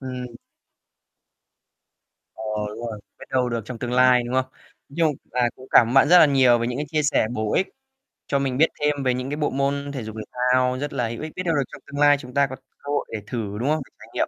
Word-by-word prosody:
Ừm. 130 -1 -5 2.1
Ờ, 110 - -9 0.3
đúng 105 +2 -8
rồi, 105 - -7 0.2
biết - - -10
đâu 125 -1 +1
được 115 -1 -2
trong 125 -3 -7
tương 120 -1 -4
lai, 125 -1 +5
đúng 125 - -4
không? 130 0 +2 0.4
Nói 140 - -16
chung 160 -3 +3 0.2
là 125 -1 +1
cũng 130 - -13
cảm 115 - +6
ơn 125 - -3
bạn 135 +1 +6
rất 180 +1 +8
là 155 - +8
nhiều 130 -4 +4
về 115 - -1
những 125 +2 -3
cái 150 - -2
chia 155 0 0
sẻ 145 -6 +2
bổ 110 -3 -2
ích 190 - +1 0.6
cho 140 - +1
mình 135 -2 -1
biết 160 +3 +5
thêm 145 -2 +1
về 130 -1 +2
những 125 +2 -4
cái 145 - -3
bộ 150 - 0
môn 140 +1 -1
thể 130 -5 -5
dục, 110 0 -8
thể - - -5 0.3
thao 130 0 +2
rất 145 0 -4
là 125 -4 -1
hữu 115 0 -6
ích. 155 0 -5
Biết 185 - -3
đâu 165 -2 +1
được 140 - +2
trong - - -11
tương 145 0 -6
lai 145 -1 +6
chúng 125 -2 -11
ta 140 0 +3
có 130 - -7
cơ 135 +2 -11
hội 145 - 0
để 110 - -2
thử, 105 -4 -4
đúng 130 - 0
không? 155 0 +1
Để - - -23
trải - - -13
nghiệm. - - 0
130 Hz, 270 wpm, -23 LUFS, 125-145 Hz, 2.1 s, rất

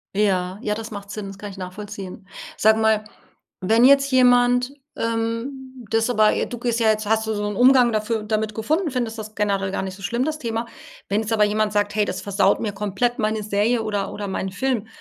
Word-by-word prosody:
Ja, 190 -2 +1
ja 210 -3 -1
das 225 +1 -7
macht 200 -1 -8
Sinn 210 -2 -5
das 195 0 -9
kann 205 0 -7
ich 195 - -12
nachvollziehen. 195 +1 -8 0.3
Sag 220 +1 +4
mal 220 -1 +2 0.6
wenn 225 +6 +4
jetzt 275 +1 +5
jemand, 245 0 +4 0.2
ähm, 230 +3 -3
das 225 +2 +1
aber 215 -3 +4
j - - 0
du 240 - -5
gehst 240 -1 -1
ja 225 -1 +3
jetzt 215 -1 0
hast 220 +1 +1
du 220 - 0
so 210 0 -3
'n 205 - -3
Umgang 250 +1 +5
dafür 215 +1 -1
damit 215 0 -1
gefunden, 305 - -1
findest 240 -3 -2
das 215 0 -7
generell 200 -2 0
gar - - -2
nicht 190 -1 -5
so 195 - -13
schlimm 240 +6 -1
das 310 0 -2
Thema. 230 -3 -3 0.4
Wenn 205 +2 +1
jetzt 220 +1 -2
aber 215 -1 +4
jemand 210 0 +1
sagt: 205 0 0
„Hey, 210 -1 +2
das - - -4
versaut 200 0 +2
mir 215 - -2
komplett 210 +4 -1
meine 215 0 0
Serie 215 +3 +1
oder 205 -2 -2
oder 205 -1 -5
meinen 190 0 -3
Film“, 230 +1 -1
215 Hz, 220 wpm, -22 LUFS, 205-235 Hz, 0.6 s, jetzt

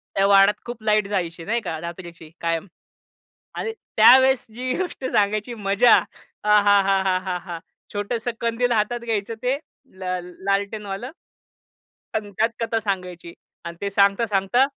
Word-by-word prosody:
त्या 195 0 +3
वाड्यात 200 +1 +5
खूप 240 -2 -8
लाईट 215 -2 +2
जायची 170 -4 -3
नाही 230 +3 0
का 165 -5 -4
रात्रीची 170 -2 -9
कायम 165 +2 -1 0.9
आणि 450 - -3 0.2
त्यावेळेस 260 +3 +6
जी 255 +1 -2
गोष्ट 360 -7 -4
सांगायची 210 +1 0
मजा 200 +3 +4
आ - - +3 0.6
हा 205 -1 +5
हा 195 -1 +3 0.2
हा 180 -1 -1
हा! 170 -2 -7 0.3
छोटसं 225 +4 -2
कंदील 235 +1 0
हातात 230 +2 +1
घ्यायचं 225 -1 -3
ते 260 +3 +1 0.4
ल 190 0 -11 0.4
लालटेनवालं. 200 +3 -2 1.0
आणि 210 -2 -3
त्यात 225 +1 +4
कथा 225 0 0
सांगायची 180 -4 -4 0.3
आणि 170 0 -7
ते 200 - -1
सांगता 200 +3 +3
सांगता 205 +6 +2
205 Hz, 140 wpm, -23 LUFS, 195-235 Hz, 1.0 s, त्यावेळेस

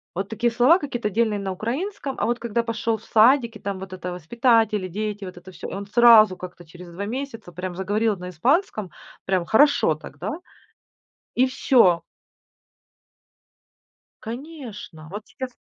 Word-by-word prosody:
Вот 195 +2 -3
такие 235 +2 0
слова, 250 +10 +5
какие-то 240 - -3
отдельные 215 0 0
на 195 -1 -3
украинском. 270 - -4
А - - +1
вот 240 +1 -1
когда 235 0 -1
пошел 230 0 -1
в 215 - -19
садик, 235 +1 +4
и 215 - -10
там 195 -1 -4
вот 190 -1 -8
это 180 -1 -5
воспитатели, 220 - +1
дети, 210 +2 -4
вот 185 -1 -9
это 180 +2 -12
всё. 180 - -8
И - - -8
он 200 +1 -5
сразу 215 -3 +6
как-то 180 -1 -10
через 175 +2 -12
2 180 +4 -5
месяца 240 -4 -6
прям 180 +1 -6
заговорил 205 +3 0
на 180 0 -7
испанском, 215 - 0 0.4
прям 185 -2 0
хорошо 220 - +4
так, 150 -2 -12
да? 185 +8 -4 1.0
И 255 - +4
всё. 230 -9 +3 2.2
Конечно, 235 - -8
вот 205 +4 -8
сейчас 260 -1 -7
215 Hz, 160 wpm, -23 LUFS, 185-240 Hz, 2.2 s, сразу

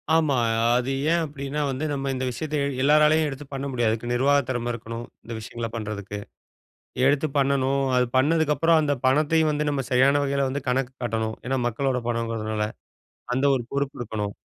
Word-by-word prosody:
ஆமா. 155 -4 +3 0.4
அது 125 +2 -1 0.2
ஏன் 170 0 +3
அப்டின்னா 140 0 -4
வந்து, 135 +4 -3
நம்ம 135 -1 -2
இந்த 130 0 -2
விஷயத்த 150 +6 -4
எ - - +1 0.2
எல்லாராலயும் 150 +2 +5
எடுத்து 140 +1 -7
பண்ண 135 0 -3
முடியாது. 120 -3 +1
இதுக்கு 120 +2 -4
நிர்வாக 140 +3 +3
திறம 120 -1 -1
இருக்கணும். 115 +1 -6 0.2
இந்த 115 - -7
விஷயங்கள 115 +1 -5
பண்றதுக்கு. 105 -2 -5 0.9
எடுத்து 145 +2 +3
பண்ணணும், 140 0 +2
அது 125 0 +3
பண்ணதுக்கு 150 +3 +3
அப்புறம் 165 -1 +4
அந்த 145 -1 +1
பணத்தையும் 155 +3 +3
வந்து, 150 0 -1
நம்ம 140 -2 -1
சரியான 135 +3 +4
வகையில 140 -1 0
வந்து 140 +2 -3
கணக்கு 130 0 0
காட்டணும். 110 -1 -2
ஏன்னா, 135 +1 0
மக்களோட 125 +2 -1
பணம்ங்கிறதுனால 115 -2 -1 0.7
அந்த 130 +2 0
ஒரு 125 - -2
பொறுப்பு 140 0 -2
இருக்கணும். 105 -3 -3
135 Hz, 170 wpm, -25 LUFS, 120-145 Hz, 0.9 s, எல்லாராலயும்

